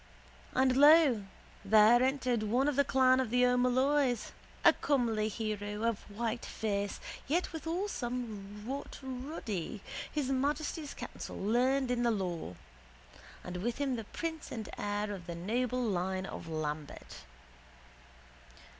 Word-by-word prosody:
And 260 0 +4
lo, 290 -7 +7 0.4
there 215 +4 +6
entered 255 -3 +1
one 240 +6 +1
of 295 - +1
the 280 - +4
clan 260 -1 +4
of 260 -3 0
the 250 +2 +4
O'Molloy's, 250 +1 +2 0.3
a - - +9
comely 230 -6 +1
hero 210 0 -3
of 230 -2 +1
white 225 +3 -3
face 205 -2 -2 0.3
yet 340 +6 0
withal 330 +5 -2
somewhat 235 - -5
ruddy, 250 - -5 0.3
his 290 -4 -1
majesty's 290 +3 -1
counsel - - -7
learned 250 +5 +2
in 245 -1 +1
the 240 - +3
law, 180 - -2 0.9
and 180 0 -5
with 230 +6 -2
him 275 -2 0
the 225 -2 -5
prince 320 +6 -5
and 220 -3 -5
heir 205 0 -2
of 180 -4 -8
the 170 - -4
noble 245 +8 -1
line 190 -3 -1
of 170 - -7
Lambert. 155 -2 -5
240 Hz, 130 wpm, -32 LUFS, 205-265 Hz, 0.9 s, a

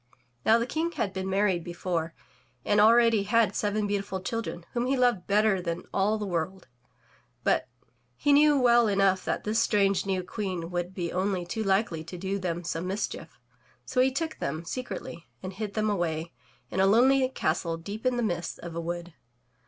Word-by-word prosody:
Now 225 - +5
the 235 - 0
King 320 +6 -2
had 200 - -2
been 190 0 -3
married 190 -3 +1
before 170 -1 -3 0.5
and 205 0 +4
already 230 0 +5
had 225 +2 +2
seven 210 0 0
beautiful 200 -2 -2
children 185 -4 -4
whom 240 0 0
he 270 +1 +1
loved 245 -7 +2
better 205 -1 +3
than 170 0 -3
all 205 +3 +2
the 210 - -3
world, 180 +1 -3 0.8
but - - +2 0.5
he 290 - +2
knew 295 0 +6
well 240 -2 +5
enough 195 -2 +2
that - - -1
this 215 +2 0
strange 200 -4 +2
new 190 -1 0
Queen 180 -3 -4
would 175 +1 -3
be 175 -3 -3
only 185 -1 -1
too 220 +5 -3
likely 190 -4 +1
to 180 +2 -8
do 195 +2 -2
them 175 -2 -3
some 165 +1 -3
mischief; 185 - -4 0.5
so 255 -1 +1
he 260 - +4
took 320 +4 -3
them 155 +4 -3
secretly 195 -6 -6 0.2
and 185 - -5
hid 205 0 -5
them 215 0 +1
away 170 -5 -1 0.4
in 190 - -2
a 190 - +5
lonely 260 +5 +4
castle 165 -7 -1
deep 200 +6 -7
in 255 -1 +1
the 240 - 0
midst 175 -6 -2
of 170 -1 -8
a 170 - -2
wood. 175 0 -5
195 Hz, 185 wpm, -28 LUFS, 175-225 Hz, 0.8 s, knew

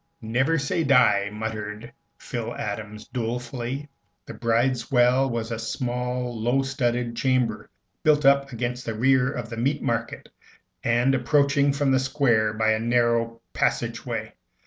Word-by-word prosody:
"Never 130 +9 +1
say 145 +4 -1
die," 125 -8 +4
muttered 110 +1 -5 0.2
Phil 120 -1 -5
Adams, 105 0 -6
dolefully. 125 +2 -4 0.4
The - - -8
bridewell 125 +2 +2
was 115 -1 -3
a 115 - -3
small 125 +1 -3
low 125 +4 +2
studded 120 -3 -1
chamber 130 0 0 0.3
built 150 -2 +3
up 140 0 +4
against 125 +1 -4
the 115 - -2
rear 130 +2 +3
end - - -4
of 115 -1 -7
the 115 - -5
Meat 140 +5 0
Market, 115 0 -3 0.5
and 120 +3 +2
approached 140 +2 +2
from 140 -1 +1
the 130 - +4
Square 130 -6 +1
by 110 0 +2
a 110 - -1
narrow 115 0 +1
passage - - -1
way. - - -4
120 Hz, 145 wpm, -25 LUFS, 115-135 Hz, 0.5 s, die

